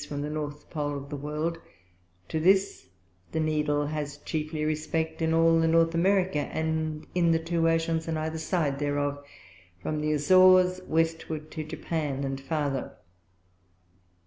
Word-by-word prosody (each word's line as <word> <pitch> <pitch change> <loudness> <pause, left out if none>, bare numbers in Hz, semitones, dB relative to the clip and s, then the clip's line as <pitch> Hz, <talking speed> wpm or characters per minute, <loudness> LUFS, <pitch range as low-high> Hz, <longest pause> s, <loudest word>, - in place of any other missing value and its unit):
from 145 -1 -4
the 150 - -4
North 150 -1 -5
Pole 145 -3 -2
of 140 +1 -9
the - - -3
World; 150 +4 -3 0.7
to 160 - -2
this 190 - +2 0.5
the 160 - 0
Needle 150 -2 +1
has 145 -1 -4
chiefly 155 +1 -3
respect 155 +1 -2
in 160 0 +1
all 165 0 +4
the 165 - +3
North 165 0 +3
America, 185 -1 +2
and 160 +1 -2
in 175 -2 +3
the 165 - +4
two 165 0 +1
Oceans 165 0 0
on 160 -1 -1
either 160 +1 -3
side 155 -4 -1
thereof, 145 0 -1 0.6
from 150 +11 -3
the 155 0 0
Azores 185 +4 +5
Westward 160 -1 -1
to 155 - -4
Japan, 155 -3 -3
and 135 0 -3
farther. 140 -2 -2
155 Hz, 150 wpm, -27 LUFS, 150-165 Hz, 0.7 s, Azores